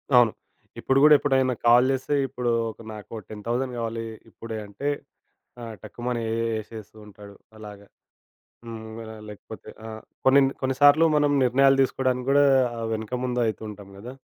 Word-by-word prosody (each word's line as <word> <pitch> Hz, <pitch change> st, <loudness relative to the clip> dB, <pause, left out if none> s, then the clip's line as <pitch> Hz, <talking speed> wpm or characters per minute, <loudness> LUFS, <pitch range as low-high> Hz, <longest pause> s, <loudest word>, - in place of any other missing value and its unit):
అవును. 120 Hz, -3 st, +6 dB, 0.5 s
ఇప్పుడు 135 Hz, 0 st, +2 dB
గూడా 150 Hz, -, +8 dB
ఎప్పుడైనా 130 Hz, -3 st, +1 dB
కాల్ 120 Hz, +2 st, +6 dB
చేస్తే 135 Hz, +2 st, -1 dB
ఇప్పుడు 125 Hz, -2 st, -3 dB, 0.2 s
ఒక 115 Hz, -, -16 dB
నాకు 105 Hz, 0 st, -11 dB, 0.2 s
10,000 120 Hz, +4 st, -3 dB
కావాలి 115 Hz, 0 st, -3 dB, 0.3 s
ఇప్పుడే 115 Hz, -1 st, -8 dB
అంటే, 140 Hz, +8 st, -4 dB, 0.7 s
ఆ! -, -, -7 dB, 0.2 s
టక్కుమని 120 Hz, +2 st, -4 dB, 0.4 s
ఎసేస్తూ 110 Hz, 0 st, -12 dB
ఉంటాడు. 100 Hz, 0 st, -14 dB, 0.2 s
అలాగా 105 Hz, -2 st, -11 dB, 0.8 s
హ్మ్, 110 Hz, -1 st, -8 dB
అలాగే 110 Hz, -1 st, -10 dB
లేకపోతే 105 Hz, -, -11 dB, 0.2 s
ఆ! -, -, -7 dB, 0.4 s
కొన్ని, 135 Hz, +1 st, +6 dB, 0.2 s
కొన్ని 130 Hz, 0 st, -1 dB
సార్లు 145 Hz, +3 st, +7 dB
మనం 145 Hz, -1 st, +3 dB
నిర్ణయాలు 135 Hz, +2 st, +4 dB
దిసుకోడానికి 130 Hz, -1 st, 0 dB
గూడా 145 Hz, +1 st, +5 dB, 0.3 s
ఆ! -, -, -5 dB
వెనక 110 Hz, +3 st, -4 dB
ముందు 125 Hz, -1 st, -1 dB
అయితుంటాం 105 Hz, -2 st, -6 dB
గాదా! 120 Hz, +6 st, -9 dB
120 Hz, 145 wpm, -25 LUFS, 110-130 Hz, 0.8 s, గూడా